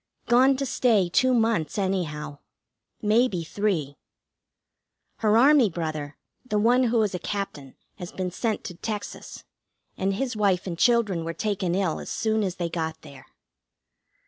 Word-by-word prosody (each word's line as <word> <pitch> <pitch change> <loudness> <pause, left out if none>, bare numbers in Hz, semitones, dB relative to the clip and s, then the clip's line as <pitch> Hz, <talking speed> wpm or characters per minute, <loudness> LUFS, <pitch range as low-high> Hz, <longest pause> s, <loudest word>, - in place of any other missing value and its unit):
Gone 260 +3 +4
to 275 - -2
stay 230 -8 +2
two 255 +9 +3
months, 225 - +1
anyhow. 155 -7 -2 0.6
Maybe 215 -4 +2
three. 160 -6 -2 1.2
Her 215 0 +3
Army 270 -2 +6
brother, 155 -4 -5 0.3
the 220 -5 -2
one 245 +4 +4
who 235 0 +2
is 205 - -1
a 180 - -3
Captain, 160 -11 -5 0.2
has 175 - -7
been 185 -1 -3
sent 220 +4 -2
to 180 - -6
Texas, 205 +4 -6 0.6
and 195 +1 0
his 250 +2 -2
wife 195 -4 +1
and 180 -3 -4
children 210 -4 +2
were 165 0 -4
taken 195 -5 -1
ill 185 -5 0
as - - -8
soon 220 0 0
as 190 -3 -2
they 175 -2 -2
got 160 -1 -4
there. 135 -2 -13
195 Hz, 150 wpm, -25 LUFS, 170-225 Hz, 1.2 s, Army